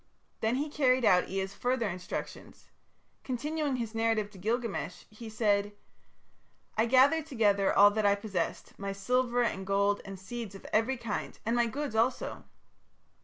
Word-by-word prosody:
Then 225 +2 +1
he 290 +3 -1
carried 260 -4 +2
out 180 -3 +4
Ea's 195 +1 -3
further 245 -1 0
instructions. 180 -1 -7 0.5
Continuing 290 +2 -2
his 230 -3 -4
narrative 225 -2 0
to 195 - -13
Gilgamesh, 215 - -2
he 220 +1 -9
said: 205 -2 +1 1.0
"I 220 +2 +2
gathered 280 +6 +4
together 205 -8 +2
all 205 +1 +7
that 215 +1 -1
I 200 - +4
possessed, 200 -5 -4
my 200 0 -3
silver 245 +4 +1
and 190 -5 -1
gold 200 +1 +1
and 195 -1 -8
seeds 215 +1 -7
of 195 - -12
every 235 +5 +2
kind, 230 -3 -4
and 230 +2 +1
my 240 -1 +3
goods 280 +2 -4
also. 230 +3 0
225 Hz, 155 wpm, -30 LUFS, 200-250 Hz, 1.0 s, all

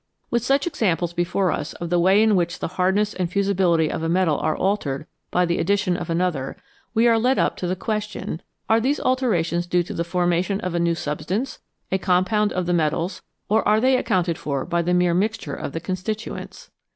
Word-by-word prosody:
With 235 -1 +1
such 275 +3 +2
examples 180 - 0
before 175 +1 0
us 150 - -3
of 170 0 -6
the 175 - +3
way 190 +5 +5
in 220 -2 +4
which 175 -1 0
the - - -4
hardness 190 +4 +1
and 180 -2 -2
fusibility 185 -5 +2
of - - -3
a 165 - -1
metal 170 -4 +2
are 155 - 0
altered 155 -9 -1 0.2
by 180 - +2
the 170 0 0
addition 200 0 +1
of 175 -1 -5
another, 165 -6 -1 0.4
we 230 +2 +4
are 230 -1 +4
led 255 +4 +2
up - - +1
to 180 - -3
the 185 - 0
question 210 -4 -4 0.3
Are 225 +1 +4
these 275 +5 +1
alterations 175 -10 +1
due 175 0 +2
to 175 - -7
the 170 - -1
formation 175 +2 0
of 185 -1 -3
a 170 - 0
new 170 0 +2
substance, 165 - -3 0.3
a 190 - +1
compound 200 +4 +2
of 180 -1 -1
the 175 - 0
metals, 165 +2 0 0.3
or 220 +2 +3
are 215 +1 +4
they 260 +3 +4
accounted 180 -8 0
for 140 -2 -2
by 170 -1 0
the 175 +1 +1
mere 180 -1 +3
mixture 205 -4 -1
of - - -5
the 165 - -4
constituents 205 - -5
180 Hz, 210 wpm, -23 LUFS, 170-210 Hz, 0.4 s, way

